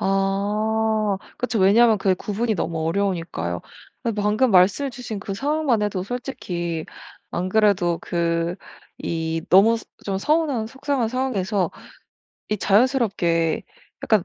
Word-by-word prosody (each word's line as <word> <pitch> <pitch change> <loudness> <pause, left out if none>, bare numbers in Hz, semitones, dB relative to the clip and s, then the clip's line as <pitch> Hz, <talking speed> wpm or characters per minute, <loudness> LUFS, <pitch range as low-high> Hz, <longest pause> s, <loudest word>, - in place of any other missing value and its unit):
아 210 +2 +1 0.2
그쵸. 250 -2 -1
왜냐하면 215 +3 +5
그게 190 -1 +2
구분이 215 +4 -2
너무 160 -2 -2
어려우니까요. 165 - -2 0.4
그 230 - 0
방금 210 +4 +2
말씀해 200 +9 +4
주신 240 -4 -6
그 195 0 -5
상황만 280 -2 +1
해도 205 -3 -1
솔직히 180 -8 -4 0.5
안 180 +2 -2
그래도 185 -5 +3
그 170 +1 -1 0.4
이 165 -1 -2
너무 205 +5 +6
스 225 - -9 0.2
좀 195 -1 -1
서운한 295 -4 +1
속상한 270 0 -1
상황에서 210 -7 -1 0.8
이 210 - 0
자연스럽게 195 - +2 0.4
약간 215 -5 +3
205 Hz, 275 characters per minute, -23 LUFS, 180-230 Hz, 0.8 s, 너무